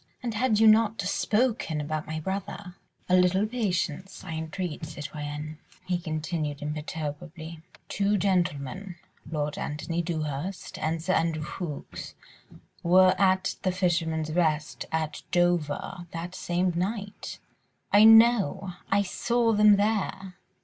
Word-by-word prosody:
And 235 -2 -2
had 220 -1 +2
you 225 - +6
not 220 0 +5
spoken 210 -4 0
about 155 +1 -3
my 155 0 -3
brother.. 190 +1 -5 0.2
." - - -40
"A 180 - +4
little 185 +2 +4
patience, 190 -6 -2
I - - -7
entreat, 160 +1 -4
citoyenne," 150 0 -6 0.3
he 180 -1 0
continued 155 -3 -3
imperturbably. 155 +2 -5 0.3
"Two 205 +1 +1
gentlemen, 180 -1 -1 0.3
Lord 150 -2 -2
Antony 165 +3 -2
Dewhurst 160 +2 -4
and 160 +1 -1
Sir 185 +2 +1
Andrew 165 -3 +1
Ffoulkes 150 -1 -6 0.7
were 185 +2 +6
at 190 0 +2
'The 185 - +1
Fisherman's 165 -4 0
Rest' 155 -3 0
at 160 -1 -2
Dover 175 -1 0
that 170 +2 -5
same 180 0 0
night." 200 +3 -3 0.5
"I 205 +1 +7
know. 225 -5 +6 0.2
I 200 +1 +3
saw 235 +4 +1
them 210 0 +7
there." 200 -2 -1
175 Hz, 125 wpm, -27 LUFS, 155-195 Hz, 0.7 s, I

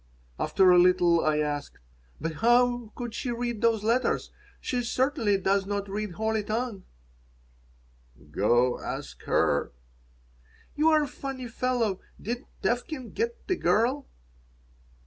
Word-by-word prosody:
After 190 -1 +4
a 180 - +7
little 175 -2 +4
I 155 -1 +2
asked: 145 -1 -2 0.4
"But 160 -1 -4
how 240 -1 +3
could 240 -2 -5
she 255 - -4
read 240 -2 -3
those 225 -3 +2
letters? 235 +4 +1 0.3
She 250 -1 -2
certainly 245 -3 +1
does 195 +1 +1
not 200 0 -2
read 205 -1 -4
holy 220 +2 -1
tongue?" 220 -1 -3 1.5
"Go 120 +8 +2
ask - - -6
her." - - +1 1.0
"You're 310 0 +4
a - - -3
funny 265 -1 -6
fellow. 235 -4 -1 0.2
Did 240 +4 -5 0.2
Tevkin 245 +1 -2
get 465 +1 -3
the 370 - +1
girl?" 235 - +1
225 Hz, 125 wpm, -27 LUFS, 190-250 Hz, 1.5 s, a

